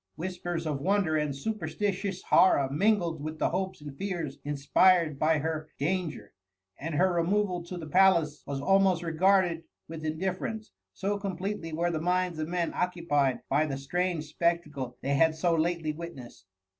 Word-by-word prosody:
Whis 180 Hz, +2 st, -5 dB
pers 175 Hz, -2 st, -3 dB
of 145 Hz, -3 st, -2 dB
wonder 190 Hz, -2 st, +2 dB
and 150 Hz, -2 st, 0 dB
superstitious 200 Hz, +1 st, -3 dB
horror 145 Hz, -7 st, +5 dB
mingled 170 Hz, -1 st, +1 dB
with 155 Hz, +1 st, -5 dB
the -, -, 0 dB
hopes 185 Hz, -2 st, -3 dB
and 145 Hz, -2 st, -8 dB
fears 170 Hz, -6 st, -4 dB
inspired 150 Hz, +2 st, +3 dB
by 155 Hz, +1 st, +3 dB
her 155 Hz, +1 st, -3 dB
dan 175 Hz, +4 st, 0 dB
ger; 105 Hz, -8 st, -11 dB, 0.5 s
and 160 Hz, +2 st, -4 dB
her 185 Hz, +4 st, +3 dB
removal 180 Hz, +1 st, +1 dB
to 180 Hz, +1 st, -6 dB
the 165 Hz, -, -6 dB
palace 165 Hz, -3 st, +3 dB
was 140 Hz, -1 st, -3 dB
almost 190 Hz, +3 st, +3 dB
regarded 170 Hz, 0 st, +2 dB, 0.2 s
with 160 Hz, -1 st, -8 dB
indifierence, 190 Hz, +7 st, -3 dB, 0.2 s
so 200 Hz, +1 st, -2 dB
completely 190 Hz, -2 st, -4 dB
wei^ 170 Hz, +2 st, 0 dB
the 160 Hz, -2 st, -2 dB
minds 180 Hz, -1 st, 0 dB
of, 155 Hz, -, -2 dB
men 175 Hz, 0 st, -1 dB
occupied 155 Hz, -7 st, 0 dB
by 150 Hz, +3 st, +2 dB
the 135 Hz, -2 st, -3 dB
strange 175 Hz, +4 st, -1 dB
spectacle 150 Hz, -6 st, -2 dB
they 140 Hz, -, 0 dB
had 160 Hz, +3 st, +3 dB
so 170 Hz, +2 st, +1 dB
lately 165 Hz, -1 st, 0 dB
witnessed. 145 Hz, -, -10 dB
170 Hz, 165 wpm, -29 LUFS, 155-185 Hz, 0.5 s, horror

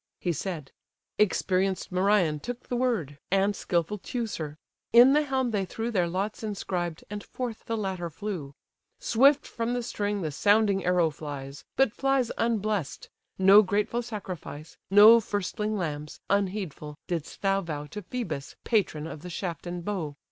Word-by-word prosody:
He 175 Hz, -, 0 dB
said: 160 Hz, -4 st, -5 dB, 0.5 s
experienced 190 Hz, -2 st, +1 dB
Merion 185 Hz, -4 st, +2 dB
took 245 Hz, +8 st, -7 dB
the 245 Hz, -, -1 dB
word; 215 Hz, -, -1 dB
And 195 Hz, +2 st, +2 dB
skilful 175 Hz, +4 st, -1 dB
Teucer: 185 Hz, -, -4 dB, 0.3 s
in 245 Hz, +4 st, +8 dB
the 300 Hz, -, +5 dB
helm 265 Hz, -4 st, 0 dB
they 205 Hz, -3 st, 0 dB
threw 225 Hz, +5 st, -4 dB
Their 180 Hz, -6 st, +2 dB
lots 195 Hz, +5 st, -2 dB
inscribed, 180 Hz, -6 st, -3 dB
and 205 Hz, 0 st, -5 dB
forth 245 Hz, -3 st, -6 dB
the 230 Hz, -, -2 dB
latter 190 Hz, -4 st, -3 dB
flew. 165 Hz, -6 st, -5 dB, 0.4 s
Swift 275 Hz, +5 st, +4 dB
from 235 Hz, +1 st, -2 dB
the 245 Hz, -, -2 dB
string 205 Hz, -3 st, -2 dB
the 155 Hz, -, -2 dB
sounding 205 Hz, +3 st, +3 dB
arrow 175 Hz, -3 st, +3 dB
flies; 145 Hz, -2 st, -7 dB
But 270 Hz, -5 st, +3 dB
flies 270 Hz, -2 st, +1 dB
unbless'd! 215 Hz, -8 st, -1 dB, 0.3 s
No 195 Hz, +2 st, +8 dB
grateful 210 Hz, +4 st, 0 dB
sacrifice, 185 Hz, -9 st, -7 dB
No 210 Hz, +4 st, +9 dB
firstling 210 Hz, +1 st, -2 dB
lambs, 150 Hz, -4 st, -4 dB
unheedful! 190 Hz, -7 st, -1 dB
didst 165 Hz, 0 st, -5 dB
thou 195 Hz, 0 st, +2 dB
vow 150 Hz, -4 st, -5 dB
To 210 Hz, +8 st, -7 dB
Phœbus, 175 Hz, -, -5 dB
patron 185 Hz, -9 st, +1 dB
of 155 Hz, -2 st, -7 dB
the 180 Hz, -, -8 dB
shaft 175 Hz, -2 st, -4 dB
and 175 Hz, 0 st, -5 dB
bow. 170 Hz, -8 st, -3 dB
195 Hz, 155 wpm, -27 LUFS, 170-220 Hz, 0.5 s, No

